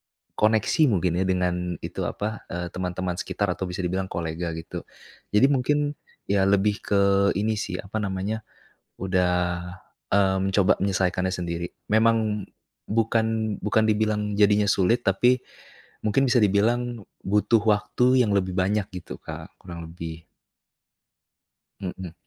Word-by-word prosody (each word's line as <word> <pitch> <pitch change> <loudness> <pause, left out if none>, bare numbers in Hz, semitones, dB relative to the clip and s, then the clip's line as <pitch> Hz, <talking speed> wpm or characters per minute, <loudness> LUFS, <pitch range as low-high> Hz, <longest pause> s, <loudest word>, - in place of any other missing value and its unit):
berkoneksi 110 +8 +1
mungkin 90 - +1
ya, 95 - +1
dengan 90 -1 +1 0.3
itu, - - -4
apa, 110 +1 -4
eee, 90 0 -3
teman-teman 90 0 -3
sekitar, 100 0 -2
atau 90 +1 -2
bisa 90 +1 -4
dibilang 95 +2 -2
kolega 85 0 -3
gitu. 80 0 -7 0.5
Jadi 105 +5 +6
mungkin, 140 +1 +2 0.5
ya 100 -1 +3
lebih 100 +1 +3
ke 100 0 +3
ini 105 +2 0
sih, 105 - -3
apa 105 +1 -6
namanya, 105 +2 -3 0.5
udah, 90 -1 +1 0.8
mmm, 95 -1 +3
coba 95 -2 +3
menyelesaikannya 95 -1 0
sendiri. 85 -1 -3 0.2
Memang 110 -2 +2 0.4
bukan 110 -1 +1
bukan 110 +2 +2
dibilang 105 -1 +1
jadinya 105 0 +4
sulit, 100 +4 +2
tapi, 120 +7 +3 0.6
mungkin 135 +6 +2
bisa 125 - +4
dibilang, 115 +4 +1 0.2
butuh 105 +3 +3
waktu 125 +4 +3
yang 105 - 0
lebih 95 -1 0
banyak 100 +2 +1
gitu 90 - -7
Kak, - - -9
kurang 85 -2 -8
lebih. 80 -1 -8 1.5
Mhm. 90 -2 -6
100 Hz, 130 wpm, -25 LUFS, 90-110 Hz, 1.5 s, Jadi